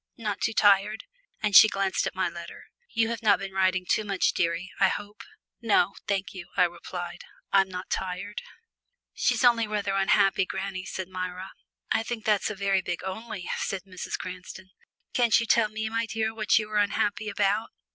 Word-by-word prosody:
Not 210 Hz, -3 st, -3 dB
too 225 Hz, -, 0 dB
tired," 205 Hz, +1 st, +3 dB, 0.4 s
and 210 Hz, -2 st, +1 dB
she 215 Hz, -, +11 dB
glanced 195 Hz, -2 st, 0 dB
at -, -, -5 dB
my -, -, +1 dB
letter. -, -, -9 dB, 0.3 s
"You 225 Hz, -1 st, +1 dB
have 230 Hz, 0 st, -4 dB
not 210 Hz, -3 st, +5 dB
been 195 Hz, +1 st, -6 dB
writing 185 Hz, -1 st, +1 dB
too 215 Hz, -, +2 dB
much, 200 Hz, -2 st, +1 dB
dearie, 170 Hz, +1 st, -1 dB
I 195 Hz, -, +6 dB
hope?" 205 Hz, +2 st, -6 dB, 0.4 s
"No, 205 Hz, -4 st, +3 dB
thank 200 Hz, -1 st, -1 dB
you," 180 Hz, -3 st, -8 dB
I -, -, +6 dB
replied, 175 Hz, 0 st, -4 dB, 0.3 s
"I'm 195 Hz, -1 st, +4 dB
not 180 Hz, 0 st, -7 dB
tired." 190 Hz, +2 st, -3 dB, 0.7 s
"She's 475 Hz, -, +1 dB
only 235 Hz, -2 st, +4 dB
rather 205 Hz, -2 st, -1 dB
unhappy, 195 Hz, -1 st, +3 dB
granny," 190 Hz, -1 st, -4 dB
said 190 Hz, -2 st, -5 dB
Myra. 185 Hz, 0 st, -5 dB, 0.4 s
"I -, -, +3 dB
think 225 Hz, -1 st, -5 dB
that's 210 Hz, -2 st, +2 dB
a 210 Hz, -, -4 dB
very 195 Hz, -1 st, +1 dB
big 175 Hz, -1 st, -4 dB
'only,'" 190 Hz, 0 st, -6 dB
said 195 Hz, -2 st, -3 dB
Mrs. 185 Hz, -2 st, -5 dB
Cranston. 185 Hz, +1 st, -9 dB, 0.4 s
"Can't 235 Hz, -3 st, +4 dB
you 230 Hz, -, -1 dB
tell 225 Hz, -1 st, +3 dB
me, 220 Hz, +1 st, -3 dB
my 230 Hz, +1 st, -1 dB
dear, 220 Hz, 0 st, -1 dB
what 215 Hz, -2 st, +2 dB
you 215 Hz, -1 st, 0 dB
are 210 Hz, -, 0 dB
unhappy 205 Hz, +1 st, 0 dB
about?" 205 Hz, +1 st, 0 dB
200 Hz, 185 wpm, -27 LUFS, 185-215 Hz, 0.7 s, she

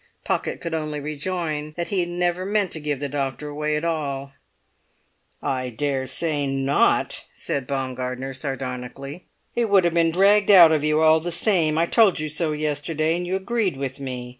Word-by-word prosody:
Pocket -, -, -2 dB
could 170 Hz, -1 st, -5 dB
only 155 Hz, -2 st, -2 dB
rejoin 155 Hz, 0 st, -3 dB
that 170 Hz, -, -3 dB
he 200 Hz, -, 0 dB
had 175 Hz, -1 st, -1 dB
never 175 Hz, +1 st, -1 dB
meant 200 Hz, -1 st, 0 dB
to 160 Hz, -, -4 dB
give 150 Hz, -2 st, -2 dB
the 145 Hz, -, -2 dB
doctor 140 Hz, 0 st, -3 dB
away 150 Hz, +1 st, -2 dB
at 150 Hz, +2 st, -2 dB
all. 140 Hz, -4 st, -3 dB, 1.1 s
"I 130 Hz, -1 st, -1 dB
daresay 140 Hz, +4 st, -1 dB
not!" 135 Hz, +1 st, +1 dB
said 135 Hz, -3 st, -3 dB
Baumgartner 130 Hz, -1 st, -3 dB
sardonically. 135 Hz, +3 st, -6 dB, 0.3 s
"It 235 Hz, -2 st, 0 dB
would 195 Hz, -2 st, +5 dB
have 170 Hz, -1 st, +1 dB
been 165 Hz, -1 st, +3 dB
dragged 200 Hz, +4 st, +4 dB
out 175 Hz, -5 st, +9 dB
of 155 Hz, -2 st, +1 dB
you 155 Hz, +1 st, +2 dB
all 160 Hz, 0 st, +6 dB
the 170 Hz, +2 st, -4 dB
same. 170 Hz, -3 st, +2 dB
I 165 Hz, -, +3 dB
told 205 Hz, -2 st, +4 dB
you 155 Hz, 0 st, -2 dB
so 155 Hz, +1 st, -1 dB
yesterday, 155 Hz, +1 st, -1 dB
and 175 Hz, 0 st, -3 dB
you 185 Hz, -, -1 dB
agreed 195 Hz, -, -1 dB
with 135 Hz, -1 st, -4 dB
me. 125 Hz, -2 st, -5 dB
155 Hz, 180 wpm, -23 LUFS, 140-175 Hz, 1.1 s, out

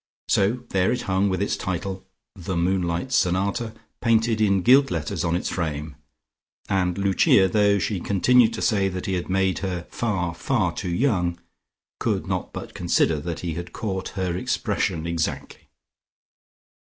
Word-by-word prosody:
So 110 Hz, +6 st, +2 dB
there 95 Hz, -1 st, +2 dB
it 125 Hz, -, -2 dB
hung 95 Hz, +1 st, +1 dB
with 95 Hz, +1 st, 0 dB
its -, -, 0 dB
title, 95 Hz, +1 st, -4 dB, 0.3 s
"The 90 Hz, -1 st, -4 dB
Moonlight 90 Hz, +5 st, 0 dB
Sonata," 100 Hz, +2 st, 0 dB, 0.3 s
painted 115 Hz, -1 st, +2 dB
in 100 Hz, -3 st, +3 dB
gilt 135 Hz, +3 st, +6 dB
letters 75 Hz, -3 st, -2 dB
on 85 Hz, -1 st, +1 dB
its 90 Hz, -, -2 dB
frame, 75 Hz, -3 st, -3 dB, 0.7 s
and 90 Hz, -2 st, 0 dB
Lucia, 100 Hz, 0 st, +4 dB
though 100 Hz, +1 st, +3 dB
she 95 Hz, +1 st, -1 dB
continued 115 Hz, +6 st, +4 dB
to -, -, -4 dB
say 100 Hz, -4 st, +2 dB
that 90 Hz, -1 st, -5 dB
he 95 Hz, -, -1 dB
had 90 Hz, 0 st, -3 dB
made 95 Hz, -1 st, +1 dB
her 90 Hz, -3 st, -3 dB
far, 95 Hz, -7 st, -1 dB
far 95 Hz, -1 st, 0 dB
too 90 Hz, -, -4 dB
young, 90 Hz, -4 st, 0 dB, 0.6 s
could -, -, -1 dB
not -, -, -3 dB
but -, -, -8 dB
consider 80 Hz, -2 st, +1 dB
that 85 Hz, +2 st, -5 dB
he 85 Hz, -2 st, -3 dB
had 85 Hz, +2 st, -7 dB
caught 95 Hz, -4 st, -3 dB
her 90 Hz, -2 st, -1 dB
expression 90 Hz, -2 st, -1 dB
exactly.... 85 Hz, -2 st, -3 dB
95 Hz, 155 wpm, -24 LUFS, 85-100 Hz, 0.7 s, gilt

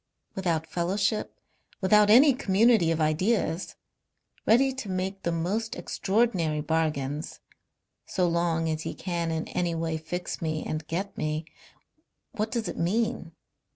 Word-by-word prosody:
Without 170 Hz, -4 st, -1 dB
fellowship. 195 Hz, +6 st, -1 dB, 0.4 s
Without 210 Hz, +2 st, +5 dB
any 265 Hz, +6 st, +7 dB
community 220 Hz, -5 st, +3 dB
of 165 Hz, -1 st, 0 dB
ideas. 165 Hz, +3 st, 0 dB, 0.7 s
Ready 265 Hz, +4 st, +5 dB
to 260 Hz, -6 st, -6 dB
make 190 Hz, +1 st, -3 dB
the 170 Hz, -, -1 dB
most 195 Hz, +7 st, -2 dB
extraordinary 190 Hz, -8 st, 0 dB
bargains. 150 Hz, -2 st, -2 dB, 0.7 s
So 180 Hz, -2 st, +1 dB
long 170 Hz, -1 st, +1 dB
as 155 Hz, -1 st, -1 dB
he -, -, -5 dB
can 170 Hz, -2 st, -2 dB
in 160 Hz, 0 st, -2 dB
any 175 Hz, -2 st, -1 dB
way 165 Hz, -1 st, -1 dB
fix 175 Hz, +3 st, -5 dB
me 155 Hz, -1 st, -2 dB
and 155 Hz, 0 st, -4 dB
get 190 Hz, +5 st, -3 dB
me. 155 Hz, +1 st, -2 dB, 0.9 s
What 215 Hz, +1 st, -2 dB
does 230 Hz, -4 st, -2 dB
it -, -, -5 dB
mean? 210 Hz, -1 st, -1 dB
175 Hz, 135 wpm, -27 LUFS, 160-210 Hz, 0.9 s, any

